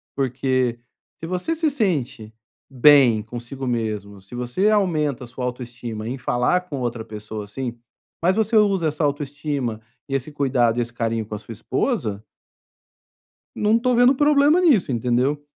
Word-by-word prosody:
porque 130 Hz, -2 st, 0 dB, 0.4 s
se 165 Hz, -, -6 dB
você 185 Hz, -, -2 dB
se 320 Hz, -1 st, +1 dB
sente 140 Hz, -, -2 dB, 0.4 s
bem 130 Hz, -4 st, +6 dB
consigo 120 Hz, +3 st, -7 dB
mesmo 105 Hz, -4 st, -3 dB
se 100 Hz, +6 st, -12 dB
você 125 Hz, -, 0 dB
aumenta 155 Hz, -, +1 dB
a -, -, -9 dB
sua 125 Hz, +1 st, -7 dB
autoestima 120 Hz, -3 st, -5 dB
em 130 Hz, -, -3 dB
falar 125 Hz, +8 st, +1 dB
com 140 Hz, -, -4 dB
outra 120 Hz, -2 st, -3 dB
pessoa, 105 Hz, 0 st, -7 dB
assim, 120 Hz, +3 st, -5 dB, 0.5 s
mas 185 Hz, +3 st, +3 dB
você 220 Hz, +1 st, +1 dB
usa 195 Hz, -6 st, +3 dB
essa 155 Hz, +1 st, -2 dB
autoestima 145 Hz, -5 st, -2 dB, 0.3 s
e -, -, -4 dB
esse 135 Hz, +3 st, -3 dB
cuidado 125 Hz, -5 st, +1 dB
e -, -, +3 dB
esse 120 Hz, 0 st, -5 dB
carinho 115 Hz, -1 st, -1 dB
com 105 Hz, 0 st, -6 dB
a -, -, -6 dB
sua 115 Hz, -, -10 dB
esposa 110 Hz, -, -2 dB, 1.3 s
não 215 Hz, +2 st, +3 dB
tô 250 Hz, 0 st, +1 dB
vendo 245 Hz, +3 st, +5 dB
problema 295 Hz, +3 st, +4 dB
nisso, 255 Hz, -, +3 dB
entendeu? 125 Hz, +5 st, 0 dB
130 Hz, 160 wpm, -22 LUFS, 115-180 Hz, 1.3 s, bem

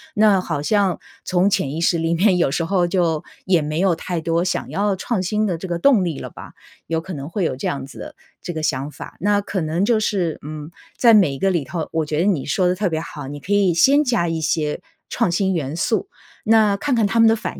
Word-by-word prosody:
那 210 Hz, -2 st, +4 dB
好 150 Hz, -5 st, -3 dB
像 195 Hz, +1 st, +1 dB, 0.2 s
从 185 Hz, +2 st, +2 dB
潜 140 Hz, -8 st, 0 dB
意 155 Hz, -, -4 dB
识 170 Hz, 0 st, +2 dB
里 165 Hz, 0 st, 0 dB
面 185 Hz, +2 st, +3 dB
有 170 Hz, -6 st, +2 dB
时 160 Hz, +4 st, -1 dB
候 180 Hz, 0 st, +1 dB
就 170 Hz, -3 st, 0 dB, 0.2 s
也 180 Hz, -4 st, +3 dB
没 155 Hz, +2 st, -3 dB
有 185 Hz, -2 st, +3 dB
太 175 Hz, +1 st, -4 dB
多 165 Hz, +1 st, 0 dB
想 185 Hz, -, -2 dB
要 200 Hz, 0 st, 0 dB
创 190 Hz, +1 st, -2 dB
新 210 Hz, +4 st, 0 dB
的 175 Hz, -4 st, -1 dB
这 190 Hz, -, -7 dB
个 170 Hz, -1 st, -3 dB
动 240 Hz, -3 st, +4 dB
力 170 Hz, -5 st, -3 dB
了 -, -, -7 dB
吧， -, -, -11 dB, 0.4 s
有 165 Hz, 0 st, 0 dB
可 185 Hz, +3 st, -8 dB
能 140 Hz, -1 st, -6 dB
会 190 Hz, +2 st, -2 dB
有 130 Hz, -, -1 dB
这 130 Hz, -, -4 dB
样 140 Hz, -1 st, -3 dB
子 -, -, -13 dB
的 -, -, -9 dB, 0.3 s
这 175 Hz, -, -5 dB
个 160 Hz, -, -4 dB
想 140 Hz, -1 st, -2 dB
法。 -, -, -10 dB
那 205 Hz, +2 st, +2 dB
可 195 Hz, -2 st, -3 dB
能 160 Hz, +4 st, -1 dB
就 220 Hz, +1 st, +3 dB
是， 185 Hz, -7 st, -1 dB
嗯， 150 Hz, 0 st, -7 dB, 0.3 s
在 235 Hz, -2 st, +6 dB
每 190 Hz, -9 st, +5 dB
一 135 Hz, -, -7 dB
个 195 Hz, -, +2 dB
里 170 Hz, -5 st, 0 dB
头， 160 Hz, +3 st, -4 dB
我 160 Hz, -1 st, -1 dB
觉 150 Hz, 0 st, -2 dB
得 175 Hz, -, +2 dB
你 180 Hz, -10 st, +1 dB
说 185 Hz, +2 st, +1 dB
的 180 Hz, -, +1 dB
特 200 Hz, +1 st, 0 dB
别 160 Hz, -1 st, -2 dB
好， 145 Hz, -3 st, -8 dB
你 145 Hz, +1 st, -7 dB
可 180 Hz, -, -8 dB
以 200 Hz, -3 st, +3 dB
先 275 Hz, -, +4 dB
加 235 Hz, -10 st, +1 dB
一 165 Hz, -1 st, -2 dB
些 155 Hz, -2 st, -1 dB, 0.3 s
创 225 Hz, -7 st, 0 dB
新 190 Hz, +2 st, +1 dB
元 150 Hz, -4 st, -3 dB
素， 220 Hz, -, 0 dB, 0.4 s
那 215 Hz, -2 st, +4 dB
看 280 Hz, +6 st, -1 dB
看 225 Hz, -2 st, +2 dB
他 230 Hz, +3 st, 0 dB
们 225 Hz, -, +7 dB
的 225 Hz, -, +4 dB
反 220 Hz, -, -6 dB
175 Hz, 275 characters per minute, -21 LUFS, 160-205 Hz, 0.4 s, 们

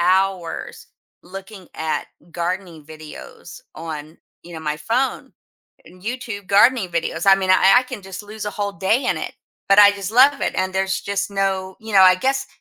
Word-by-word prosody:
hours 185 Hz, -1 st, -1 dB, 0.4 s
looking 190 Hz, 0 st, -11 dB
at 160 Hz, 0 st, -3 dB, 0.3 s
gardening 175 Hz, -2 st, -4 dB
videos 155 Hz, -1 st, -12 dB
on, 155 Hz, -1 st, -8 dB, 0.3 s
you 175 Hz, 0 st, -12 dB
know, 160 Hz, -, -7 dB
my 150 Hz, -1 st, -3 dB
phone, 250 Hz, -, -2 dB, 0.5 s
and 180 Hz, 0 st, -17 dB
YouTube 225 Hz, -4 st, -5 dB
gardening 205 Hz, 0 st, +4 dB
videos. 165 Hz, 0 st, -2 dB
I 195 Hz, -, +8 dB
mean, 190 Hz, -1 st, -1 dB
I 190 Hz, +2 st, +6 dB
I -, -, +1 dB
can 250 Hz, -6 st, -8 dB
just 195 Hz, +2 st, -8 dB
lose 215 Hz, +1 st, -8 dB
a 210 Hz, -, -3 dB
whole 205 Hz, -1 st, -3 dB
day 215 Hz, +7 st, 0 dB
in -, -, +1 dB
it, -, -, -5 dB, 0.4 s
but 195 Hz, +1 st, +5 dB
I 205 Hz, 0 st, +8 dB
just 200 Hz, +1 st, -6 dB
love 275 Hz, +4 st, +5 dB
it -, -, -1 dB
and 185 Hz, 0 st, -1 dB
there's 190 Hz, 0 st, 0 dB
just 200 Hz, 0 st, -3 dB
no 190 Hz, -1 st, -2 dB
you 220 Hz, -1 st, -9 dB
know, 190 Hz, -, +7 dB
I 185 Hz, -1 st, +7 dB
guess 270 Hz, +5 st, -1 dB
195 Hz, 185 wpm, -20 LUFS, 180-210 Hz, 0.5 s, I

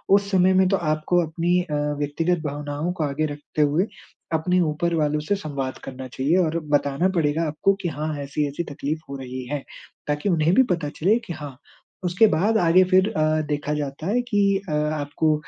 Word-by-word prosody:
उस 200 Hz, 0 st, +1 dB
समय 190 Hz, -1 st, +4 dB
में 185 Hz, 0 st, +4 dB
तो 195 Hz, -, +3 dB
आपको 155 Hz, +2 st, +1 dB
अपनी 175 Hz, +3 st, +1 dB
अ, 165 Hz, -4 st, -4 dB, 0.2 s
व्यक्तिगत 165 Hz, +4 st, 0 dB
भावनाओं 145 Hz, +3 st, -3 dB
को 175 Hz, -3 st, -2 dB
आगे 145 Hz, +2 st, -1 dB
रखते 145 Hz, +1 st, -4 dB
हुए 150 Hz, +7 st, +2 dB, 0.5 s
अपने 180 Hz, +3 st, +2 dB
ऊपर 165 Hz, +1 st, 0 dB
वालों 150 Hz, -1 st, +1 dB
से 180 Hz, +7 st, 0 dB
संवाद 140 Hz, -8 st, -4 dB
करना 130 Hz, -1 st, -7 dB
चाहिए 135 Hz, +7 st, 0 dB
और 165 Hz, -2 st, +1 dB
बताना 145 Hz, +4 st, +2 dB
पड़ेगा 160 Hz, -1 st, +1 dB
आपको 155 Hz, +6 st, +2 dB
कि," 180 Hz, -, -2 dB
हाँ, 155 Hz, 0 st, -3 dB
ऐसी-ऐसी 145 Hz, +3 st, -2 dB
तकलीफ़ 150 Hz, +3 st, -3 dB
हो 140 Hz, -, -5 dB
रही 130 Hz, -1 st, -6 dB
है।" 145 Hz, +1 st, -3 dB, 0.4 s
ताकि 150 Hz, +6 st, -1 dB
उन्हें 165 Hz, -1 st, +3 dB
भी 260 Hz, -, +7 dB
पता 165 Hz, -4 st, -3 dB
चले 200 Hz, +8 st, +3 dB
कि 175 Hz, -, -5 dB
हाँ 145 Hz, -4 st, -8 dB, 0.5 s
उसके 180 Hz, +5 st, +4 dB
बाद 205 Hz, +6 st, +2 dB
आगे 175 Hz, +1 st, +5 dB
फिर 185 Hz, +2 st, +4 dB
अ, 155 Hz, -2 st, +2 dB
देखा 150 Hz, 0 st, -2 dB
जाता 145 Hz, +2 st, -4 dB
है 235 Hz, +5 st, +2 dB
कि 205 Hz, -3 st, +1 dB, 0.3 s
अ, -, -, -3 dB
आपको 150 Hz, +1 st, 0 dB
155 Hz, 190 wpm, -23 LUFS, 145-180 Hz, 0.5 s, भी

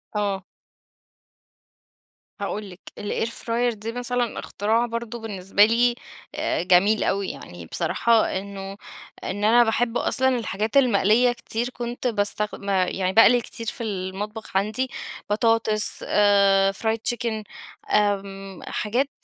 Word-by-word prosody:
آه. 200 Hz, -2 st, -1 dB, 2.0 s
هاقول 205 Hz, 0 st, -4 dB
لِك 180 Hz, 0 st, -13 dB, 0.2 s
الair 205 Hz, +2 st, -2 dB
fryer 235 Hz, +1 st, -1 dB
دي 220 Hz, +2 st, -6 dB
مثلًا 245 Hz, 0 st, -2 dB
اختراع 225 Hz, +4 st, 0 dB
برضو 235 Hz, 0 st, -5 dB
بالنسبة 205 Hz, -2 st, +2 dB
لي، 240 Hz, +2 st, +3 dB, 0.4 s
آآ -, -, -1 dB
جميل 195 Hz, +4 st, +4 dB
أوي، 195 Hz, -1 st, 0 dB
يعني 85 Hz, -1 st, -9 dB
بصراحة 230 Hz, -, +1 dB
إنّه 195 Hz, 0 st, -8 dB, 0.5 s
إن 205 Hz, +2 st, -4 dB
أنا 235 Hz, +3 st, +6 dB
باحب 230 Hz, +1 st, 0 dB
أصلًا 260 Hz, 0 st, +2 dB
الحاجات 220 Hz, +2 st, -1 dB
المقلية 240 Hz, -1 st, +4 dB
كتير، 240 Hz, 0 st, -3 dB
كنت 245 Hz, 0 st, -4 dB
باستخد 210 Hz, -2 st, -2 dB
آآ، 190 Hz, -2 st, +3 dB
يعني 185 Hz, 0 st, -1 dB
باقلي 240 Hz, +2 st, +6 dB
كتير 230 Hz, 0 st, -8 dB
في 230 Hz, -, -4 dB
المطبخ 205 Hz, +1 st, -4 dB
عندي 215 Hz, +6 st, 0 dB, 0.4 s
بطاطس، 220 Hz, 0 st, +1 dB
آآ 200 Hz, -1 st, +4 dB
fried 220 Hz, +3 st, -1 dB, 0.2 s
chicken 225 Hz, -3 st, -3 dB, 0.5 s
آمم، 195 Hz, -2 st, -1 dB
حاجات 245 Hz, +7 st, -1 dB
215 Hz, 120 wpm, -24 LUFS, 200-235 Hz, 2.0 s, أنا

